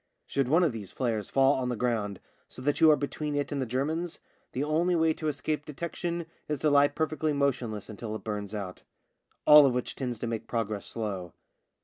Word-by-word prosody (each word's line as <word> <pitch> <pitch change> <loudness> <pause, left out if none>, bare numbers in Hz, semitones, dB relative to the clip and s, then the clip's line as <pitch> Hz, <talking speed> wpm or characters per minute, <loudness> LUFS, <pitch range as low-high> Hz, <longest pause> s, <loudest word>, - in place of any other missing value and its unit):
Should 135 -2 0
one 165 +7 +4
of 165 - +3
these 105 -5 -7
flares 115 -5 -2
fall 135 +1 +4
on 130 -2 -1
the 125 - -1
ground, 110 -5 -1 0.3
so - - -12
that 145 +1 0
you 160 - +8
are 155 - +7
between 145 +1 -3
it 145 0 -1
and 140 -2 -1
the 130 - -2
Germans, 155 +8 -2 0.3
the 130 - -1
only 165 +4 +2
way 160 -1 +3
to 155 - -4
escape 150 +1 -1
detection 170 +3 -4 0.2
is 150 - -1
to 150 - +3
lie 145 0 +6
perfectly 155 0 -1
motionless 125 -7 -1
until 110 0 -6
it - - -7
burns 105 -1 -4
out. 95 -3 -5 0.6
All 150 0 +10
of 130 -3 +3
which 125 - -2
tends 125 -3 -3
to 115 - -4
make 115 -1 -3
progress 110 -3 -2
slow. 95 -6 -4
135 Hz, 210 wpm, -29 LUFS, 110-150 Hz, 0.6 s, All